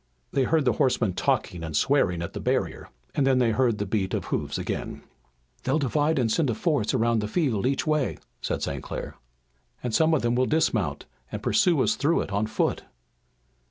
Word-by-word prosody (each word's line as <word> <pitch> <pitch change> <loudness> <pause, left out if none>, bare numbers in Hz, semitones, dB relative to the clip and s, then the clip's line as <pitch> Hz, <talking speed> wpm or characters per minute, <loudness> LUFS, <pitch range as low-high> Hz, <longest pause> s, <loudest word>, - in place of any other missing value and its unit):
They 135 -2 +2
heard 160 -1 +2
the 125 - +3
horsemen 120 -6 +2
talking 110 -6 0
and 80 -2 -2
swearing 90 - +2
at 85 - -6
the - - -5
barrier, - - -1 0.2
and 135 - +1
then 130 -1 +4
they 120 -3 +3
heard 120 -1 +2
the 105 - -2
beat 95 -1 -1
of - - -3
hoofs - - -2
again. - - -4 0.6
"They'll 130 +3 +1
divide 150 +2 +1
and 120 -4 +1
send 145 +2 +2
a 115 - 0
force 140 - 0
around 115 -1 +2
the 105 - -2
field 125 - 0
each 135 - 0
way!" 155 -4 0 0.2
said - - -2
St. - - -3
Clair. - - -6 0.7
"And 120 -2 -2
some 160 +4 +4
of 145 - -1
them 120 0 +2
will 125 +1 +2
dismount 160 +1 0 0.3
and - - -5
pursue 170 -5 +3
us - - +2
through 165 -4 +1
it - - -5
on 100 +2 0
foot!" 110 - 0
130 Hz, 200 wpm, -26 LUFS, 110-145 Hz, 0.7 s, then